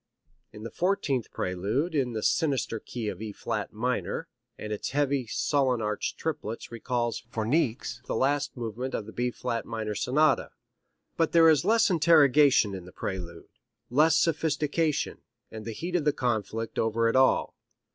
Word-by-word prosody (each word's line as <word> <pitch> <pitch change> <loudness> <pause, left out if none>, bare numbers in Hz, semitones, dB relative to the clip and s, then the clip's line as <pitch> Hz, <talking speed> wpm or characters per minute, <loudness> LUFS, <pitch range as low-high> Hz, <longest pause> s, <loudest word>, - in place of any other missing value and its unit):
It - - -13
is 105 - -9
the 115 - -6
fourteenth 170 - 0
prelude 105 - -1
in 130 -5 0
the 110 - -3
sinister 135 -7 +1
key 115 -1 -6
of 95 -1 -4
E 110 -1 -4
flat 105 0 -4
minor, 125 +8 -2 0.3
and 105 0 -5
its 105 - -4
heavy, 140 -3 0
sullen 130 +1 +1
arched 105 -1 -2
triplets 115 -10 -4
recalls 120 -1 -2
for 110 -2 -3
Niecks 125 -2 0
the - - -2
last 140 +3 0
movement 120 +3 -4
of 105 - -3
the 110 - -9
B 120 +2 -1
flat 115 -1 -3
minor 110 -2 -4
Sonata; 140 +7 +2 0.6
but 165 -1 +1
there 165 -1 +7
is 155 -1 +4
less 220 +1 +3
interrogation 150 - +5
in 95 -2 -7
the 90 - -12
prelude, 85 -4 -6 0.4
less 155 +4 +4
sophistication, 155 -2 0 0.3
and 110 -1 -8
the 115 - -4
heat 175 +11 -4
of 150 -4 +1
conflict 115 -3 -2
over 115 +1 +1
it 115 - +1
all. 130 0 +3
125 Hz, 165 wpm, -28 LUFS, 110-150 Hz, 0.6 s, there